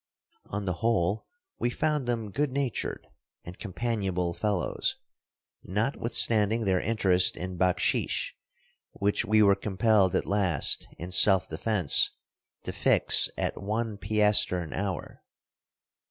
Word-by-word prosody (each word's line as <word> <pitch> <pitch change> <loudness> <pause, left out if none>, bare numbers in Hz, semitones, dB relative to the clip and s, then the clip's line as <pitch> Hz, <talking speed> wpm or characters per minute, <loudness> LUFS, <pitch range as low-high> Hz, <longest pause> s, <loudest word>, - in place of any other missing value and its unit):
On 100 0 -5
the 90 - -1
whole 105 -3 0 0.3
we 120 - 0
found 150 0 -2
them 115 -4 -3
good 145 +5 -1
natured 135 -3 -3 0.4
and 90 +1 -11
companionable 95 -5 -3
fellows, 90 +1 -2 0.7
notwithstanding 110 0 +1
their 95 -2 +1
interest 95 -5 +1
in 90 0 -6
baksheesh 90 0 0 0.6
which 100 +1 -1
we 110 0 +3
were 100 -1 +5
compelled 100 -1 +1
at - - 0
last, 95 -7 0
in 90 +2 -8
self 95 0 +5
defense, 90 0 +2 0.5
to - - -5
fix - - +4
at - - -3
one 105 +1 -3
piaster 105 -3 +2
an 80 - -9
hour. 95 -2 -5
100 Hz, 120 wpm, -27 LUFS, 90-115 Hz, 0.7 s, were